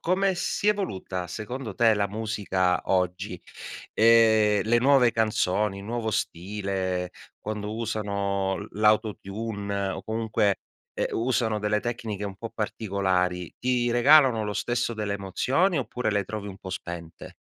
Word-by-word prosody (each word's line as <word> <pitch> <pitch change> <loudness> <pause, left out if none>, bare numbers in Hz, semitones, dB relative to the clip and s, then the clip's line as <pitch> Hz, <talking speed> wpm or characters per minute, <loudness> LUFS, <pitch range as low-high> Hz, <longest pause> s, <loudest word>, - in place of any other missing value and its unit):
come 190 +2 +1
si 190 +3 -2
è - - +7
evoluta 95 - -4
secondo 110 +5 -6
te 115 0 +4
la 100 -1 +1
musica 100 -4 0
oggi? 90 0 0 0.5
Ehm, 110 -2 +5
le 120 +2 +3
nuove 125 -1 +5
canzoni, 105 -2 +1
nuovo 115 +2 -3
stile, 95 -1 -2 0.3
quando 105 0 -4
usano 100 -3 -1
l - - -7
l' 105 - -3
autotune 100 -1 0
o 95 - -4
comunque, 110 -3 0 0.4
ehm, - - -1
usano 115 -2 0
delle 105 0 0
tecniche 110 -4 -4
un 100 -1 -5
po' 115 +3 -7
particolari, 95 -5 -1
ti 125 -1 +1
regalano 125 -2 +5
lo 105 - -2
stesso 120 +3 -1
delle 105 -2 -2
emozioni 130 - +1
oppure 125 -2 -2
le 100 -1 0
trovi 105 +1 -5
un 95 -1 -9
po' 95 - -9
spente? 85 -2 -7
105 Hz, 140 wpm, -26 LUFS, 95-115 Hz, 0.5 s, è